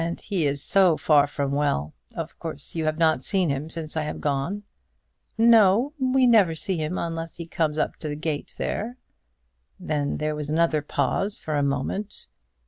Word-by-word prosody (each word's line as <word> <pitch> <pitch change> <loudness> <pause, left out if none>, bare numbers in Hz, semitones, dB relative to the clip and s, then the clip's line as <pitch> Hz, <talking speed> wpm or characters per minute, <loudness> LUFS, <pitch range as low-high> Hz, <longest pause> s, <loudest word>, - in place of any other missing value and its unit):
"And 170 +1 -3
he 180 -7 -1
is 140 0 -2
so 185 -5 +4
far 145 -2 +4
from 140 -1 -2
well. 140 - 0 0.2
Of - - -6
course 70 - -7
you 160 -1 -2
have 155 0 0
not 160 -5 +2
seen 185 -3 +1
him 140 +3 -3
since 160 -2 -5
I 160 - 0
have 150 - -3
been - - -9
gone." 150 +8 -1 0.7
"No; 230 +3 +5
we 260 0 +3
never 210 -9 +5
see 185 +3 -2
him 155 +3 -2
unless 165 -1 -4
he 170 - -7
comes 155 -2 -1
up - - -1
to 155 - -6
the 145 - -3
gate 155 -1 -4
there." 235 +4 -3 0.8
Then 150 -5 -1
there 155 0 -1
was 150 -1 -5
another 160 -1 +2
pause 195 +7 -1
for 155 - -4
a 145 - +2
moment. 140 +9 -2
160 Hz, 190 wpm, -25 LUFS, 150-190 Hz, 0.8 s, No